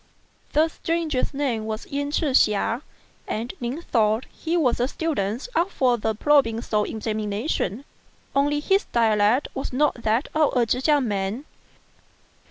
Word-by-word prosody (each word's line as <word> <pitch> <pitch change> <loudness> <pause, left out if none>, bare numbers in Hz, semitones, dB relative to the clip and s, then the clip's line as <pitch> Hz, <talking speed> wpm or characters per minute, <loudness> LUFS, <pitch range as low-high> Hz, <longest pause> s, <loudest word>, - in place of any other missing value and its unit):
The 310 +2 +4
stranger's 325 -4 -2
name 265 -6 -1
was 220 0 -4
Yen 285 +1 -3
Ch'ih 295 -1 0
hsia, 225 +1 +3 0.5
and 230 +3 -3
Ning 255 +8 -3
thought 220 -2 +1
he 335 +1 -2
was 260 -8 +2
a 245 - +2
student 270 - -2
up 355 -2 +2
for 255 -8 +2
the 220 +1 -1
provincial 230 -5 +2
examina 215 +1 -3
tion, 265 -4 -2 0.5
only 290 +1 +2
his 390 +6 +2
dialect 225 +2 +2
was 270 - -4
not 260 -2 +1
that 225 +5 +1
of 310 -4 +2
a 240 - +4
Chekiang 265 +3 +2
man. 205 +6 -2
250 Hz, 145 wpm, -24 LUFS, 220-295 Hz, 0.5 s, The